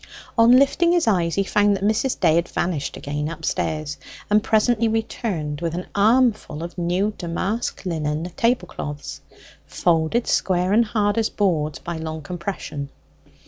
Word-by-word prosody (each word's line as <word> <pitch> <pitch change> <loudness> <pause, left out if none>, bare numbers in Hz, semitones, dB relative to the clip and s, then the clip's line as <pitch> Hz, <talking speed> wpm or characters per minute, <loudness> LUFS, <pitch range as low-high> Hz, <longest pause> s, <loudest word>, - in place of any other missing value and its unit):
On 230 +1 +6
lifting 335 +6 +3
his 350 -2 +2
eyes 175 -6 +2
he 200 - +2
found 205 +1 +2
that 195 - -7
Mrs. 220 +5 +1
Day 165 -3 +4
had 170 0 +1
vanished 160 -6 -2
again 150 +1 -3
upstairs, 155 -2 -3 0.3
and 210 0 +4
presently 225 +1 +2
returned 200 - -2
with 170 -1 -2
an 180 - -4
armful 215 -6 +2
of 170 - -7
new 180 +4 0
damask 190 +7 -3
linen 160 0 -2
tablecloths, 180 - -2 0.5
folded 170 +7 +1
square 185 +1 +1
and 230 +2 +5
hard 210 0 +1
as 220 - +1
boards 160 -7 0
by 170 -1 -6
long 160 -1 -5
compression. 170 -4 -5
180 Hz, 145 wpm, -22 LUFS, 160-220 Hz, 0.5 s, On